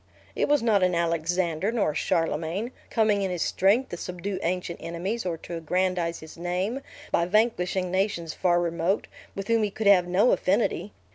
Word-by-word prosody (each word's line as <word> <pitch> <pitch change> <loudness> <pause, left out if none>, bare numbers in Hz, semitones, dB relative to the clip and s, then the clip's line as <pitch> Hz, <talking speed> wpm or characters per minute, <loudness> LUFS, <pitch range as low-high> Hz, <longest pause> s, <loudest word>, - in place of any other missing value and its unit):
It - - +1
was 290 -4 +3
not 215 -4 +3
an 180 -1 +2
Alexander 170 +2 0
nor 220 -9 +1
a - - -10
Charlemagne, 165 +8 -1 0.2
coming 215 -3 +2
in 195 - 0
his 180 -2 -1
strength 215 +8 +2
to 175 - -5
subdue 185 +2 -4
ancient 175 0 -2
enemies, 185 +6 -3
or 170 -2 -2
to 170 +1 -7
aggrandize 175 0 -1
his 160 +1 -11
name, 180 +9 -2 0.3
by 170 - +2
vanquishing 185 -3 +1
nations 185 -4 -1
far 175 -2 +2
remote, 170 +2 0 0.3
with 195 0 -5
whom 230 -1 +3
he 210 - +1
could 215 +2 -5
have 190 -3 +6
no 190 +7 +4
affinity! 205 +1 +1
180 Hz, 180 wpm, -26 LUFS, 170-205 Hz, 0.3 s, have